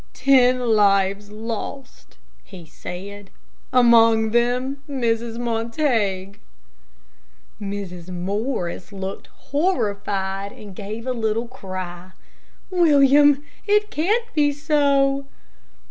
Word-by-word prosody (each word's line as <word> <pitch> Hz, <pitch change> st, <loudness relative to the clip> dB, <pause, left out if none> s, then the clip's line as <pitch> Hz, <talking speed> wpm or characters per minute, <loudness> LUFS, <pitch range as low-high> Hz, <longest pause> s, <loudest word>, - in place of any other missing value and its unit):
"Ten 255 Hz, -1 st, +4 dB
lives 205 Hz, -3 st, +2 dB
lost," 230 Hz, +4 st, -7 dB, 0.3 s
he 180 Hz, -4 st, -12 dB
said; 195 Hz, +5 st, -9 dB, 0.4 s
"among 230 Hz, -3 st, +5 dB
them 250 Hz, +4 st, 0 dB
Mrs. 235 Hz, -3 st, -1 dB
Montague." 225 Hz, -5 st, -1 dB, 1.2 s
Mrs. 195 Hz, -3 st, -6 dB
Morris 185 Hz, 0 st, -3 dB
looked 195 Hz, -1 st, -6 dB
horrified, 200 Hz, -, -2 dB
and 205 Hz, -3 st, -12 dB
gave 215 Hz, +3 st, -7 dB
a 255 Hz, -, -1 dB
little 225 Hz, 0 st, -1 dB
cry, 185 Hz, -6 st, -8 dB, 0.6 s
"William, 290 Hz, -4 st, +5 dB, 0.2 s
it 420 Hz, +1 st, +2 dB
can't 420 Hz, +10 st, +1 dB
be 290 Hz, -1 st, +3 dB
so!" 280 Hz, -2 st, +1 dB
230 Hz, 85 wpm, -22 LUFS, 200-275 Hz, 1.2 s, among